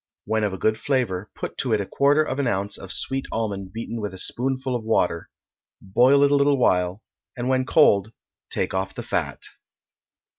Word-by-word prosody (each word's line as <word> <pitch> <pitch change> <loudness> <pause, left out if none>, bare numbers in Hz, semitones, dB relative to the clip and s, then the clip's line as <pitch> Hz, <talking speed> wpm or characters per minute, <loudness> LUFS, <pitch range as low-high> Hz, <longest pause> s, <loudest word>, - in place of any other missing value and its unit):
When 110 0 0
of 105 - +1
a 95 - -5
good 110 +3 +1
flavor, 115 -8 -1
put - - -6
to 125 -4 0
it 110 - +2
a 100 - -2
quarter 145 +8 +3
of 135 -2 -3
an 140 - +1
ounce 100 -1 -1
of 95 - -7
sweet 135 0 -2
almond 100 -4 -3
beaten 115 +1 -5
with 105 -2 -4
a - - -9
spoonful 130 +5 -2
of 120 - -3
water; 90 -6 0 0.5
boil 125 +8 +4
it 140 - +4
a - - +5
little 140 0 +3
while, 90 -3 +1 0.3
and 120 0 -3
when 130 0 +1
cold 105 - +4 0.4
take - - -1
off 95 0 -2
the - - -5
fat. - - -3
115 Hz, 195 wpm, -24 LUFS, 100-130 Hz, 0.5 s, a